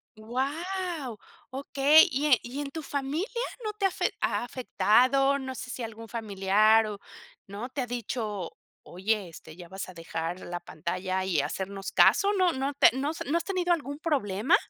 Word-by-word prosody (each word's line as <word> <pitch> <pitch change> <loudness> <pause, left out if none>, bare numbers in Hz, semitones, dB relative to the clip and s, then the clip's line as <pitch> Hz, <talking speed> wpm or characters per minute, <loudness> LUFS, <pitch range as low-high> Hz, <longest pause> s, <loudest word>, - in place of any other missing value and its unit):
¡Guau! 280 - -3 0.3
Okey. 280 +3 +5
¿Y 275 +3 0
e 260 -5 +5
y 250 +4 -6
en 275 - -5
tu 320 +2 -5
familia 285 +7 -2 0.4
no 425 -1 -3
te 400 -1 -1
ha - - +5
afe 370 - -1
ha - - 0
afectado? 260 +3 +3
No 265 -1 -5
sé - - -7
si 250 - -5
algún 225 0 -7
familiar 215 0 +3
o, 205 -1 -6 0.5
¿no?, 205 +6 -6
te 265 +1 -3
ha 245 - -3
dicho: 215 -6 -4 0.3
"Oye, 195 +1 -2
este, 160 -1 -12
¿ya 175 -1 -11
vas 190 0 -6
a 185 - -10
dejar 165 +1 -4
la 175 0 -5
pantalla 185 +3 -3
y 170 -7 +2
hacernos 195 +4 -4
caso?". 405 +1 +5
¿No 370 -3 +3
no 270 +2 -2
te 280 - +6
no 285 +3 -1
se 315 - -6
no 335 - +3
has - - -2
tenido 360 -3 +1
algún 285 -2 -4
problema? 265 - +2
245 Hz, 185 wpm, -28 LUFS, 195-285 Hz, 0.5 s, te